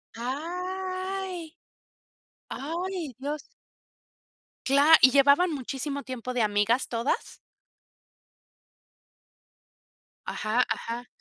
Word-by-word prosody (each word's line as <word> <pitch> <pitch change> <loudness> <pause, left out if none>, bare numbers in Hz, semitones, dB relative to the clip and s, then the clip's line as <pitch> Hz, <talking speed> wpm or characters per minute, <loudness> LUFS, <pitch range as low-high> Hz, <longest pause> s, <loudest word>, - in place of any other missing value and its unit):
¡Ay! 365 +5 -4 1.0
¡Ay, 335 +1 -4
Dios! 290 +2 -5 1.2
Cla 285 +4 +7
¿y 260 - +7
llevaban 280 +6 +5
muchísimo 275 +1 -4
tiempo 255 0 -5
de 250 - 0
amigas 210 +4 +2
todas? 235 +3 -2 2.9
Ajá, 220 +4 +1
ajá. 240 +2 -4
280 Hz, 70 wpm, -27 LUFS, 250-350 Hz, 2.9 s, Cla